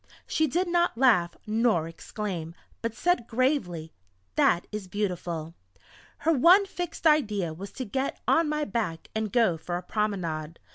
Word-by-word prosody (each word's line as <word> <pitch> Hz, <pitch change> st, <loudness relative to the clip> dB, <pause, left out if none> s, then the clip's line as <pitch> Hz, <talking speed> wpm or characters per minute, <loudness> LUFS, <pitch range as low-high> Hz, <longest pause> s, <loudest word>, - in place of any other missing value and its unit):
She 315 Hz, -1 st, +1 dB
did 355 Hz, +7 st, 0 dB
not 345 Hz, -6 st, +1 dB
laugh 215 Hz, -10 st, +4 dB
nor 215 Hz, -7 st, +2 dB
exclaim, 170 Hz, -1 st, -5 dB, 0.3 s
but 230 Hz, -1 st, -3 dB
said 350 Hz, -5 st, +1 dB
gravely: 225 Hz, -, 0 dB, 0.4 s
"That 175 Hz, 0 st, +3 dB
is 210 Hz, -3 st, -5 dB
beautiful!" 175 Hz, -5 st, -3 dB, 0.6 s
Her 325 Hz, +3 st, +2 dB
one 350 Hz, +8 st, +6 dB
fixed 355 Hz, -3 st, -6 dB
idea 210 Hz, -, +3 dB
was 195 Hz, +5 st, -8 dB
to 260 Hz, -, -5 dB
get 265 Hz, +5 st, -2 dB
on 325 Hz, -2 st, +4 dB
my 300 Hz, 0 st, 0 dB
back 200 Hz, -, -3 dB
and 220 Hz, -2 st, -2 dB
go 220 Hz, -8 st, +3 dB
for 175 Hz, +2 st, -4 dB
a 180 Hz, -, -7 dB
promenade. 170 Hz, -6 st, -2 dB
215 Hz, 150 wpm, -27 LUFS, 175-280 Hz, 0.6 s, one